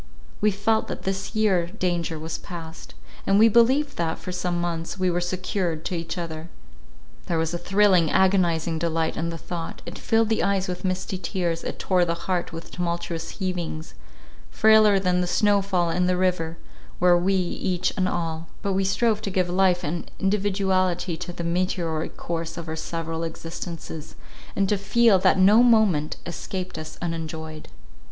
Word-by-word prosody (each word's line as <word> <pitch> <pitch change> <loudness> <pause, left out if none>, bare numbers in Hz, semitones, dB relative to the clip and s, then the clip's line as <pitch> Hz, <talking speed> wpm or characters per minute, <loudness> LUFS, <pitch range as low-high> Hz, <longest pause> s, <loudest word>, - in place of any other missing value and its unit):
We 210 - +4
felt 210 +2 +1
that - - -5
for - - -16
this 195 +3 -3
year 195 -6 +2
danger 175 -4 -2
was 160 +1 -5
past; 165 - -9 0.3
and 195 - +4
we 220 +2 +7
believed 260 +6 +3
that, 165 -1 -1
for 185 - -7
some 180 -1 -1
months, 170 +1 -3
we 185 -1 +1
were 175 +1 0
secured 175 -2 -2
to 180 - -2
each 165 +2 -4
other. 165 -1 -5 0.8
There 170 - 0
was 160 +1 -1
a 175 - -2
thrilling, 185 -2 +4
agonizing 170 -4 +2
delight 165 -1 0
in 165 +1 -2
the 165 - -5
thought—it 165 0 -7
filled 225 -1 +2
the 220 - +1
eyes 195 -1 +1
with 180 +1 -5
misty 185 0 -2
tears, 175 -4 -2
it - - -4
tore 180 -2 +2
the 170 -1 0
heart 180 -2 -1
with 165 0 -8
tumultuous 170 -1 -3
heavings; 175 -5 -4 0.6
frailer 215 -2 +5
than 180 -1 +1
the 180 - -1
"snow 205 +2 +3
fall 180 -4 0
in 180 +1 +1
the 180 0 +2
river," 175 -3 0 0.4
were 180 0 +5
we 185 +3 +2
each 180 0 -1
and 185 -2 +1
all—but 165 +3 -3
we 195 +1 +1
strove 215 +3 +1
to 210 - -3
give 185 -2 0
life 180 0 +2
and 170 +2 -3
individuality 190 -3 +1
to 175 - -6
the 170 - -6
meteoric 170 -2 -1
course 165 -1 -4
of 170 -1 -6
our 160 - -3
several 165 0 -4
existences, 165 -1 -7 0.4
and 195 0 +2
to 205 0 +1
feel 210 0 +4
that 185 - +4
no 200 +5 +6
moment 215 -11 +3
escaped 185 0 -5
us 155 0 -8
unenjoyed. 160 -2 -5
180 Hz, 175 wpm, -24 LUFS, 165-195 Hz, 0.8 s, we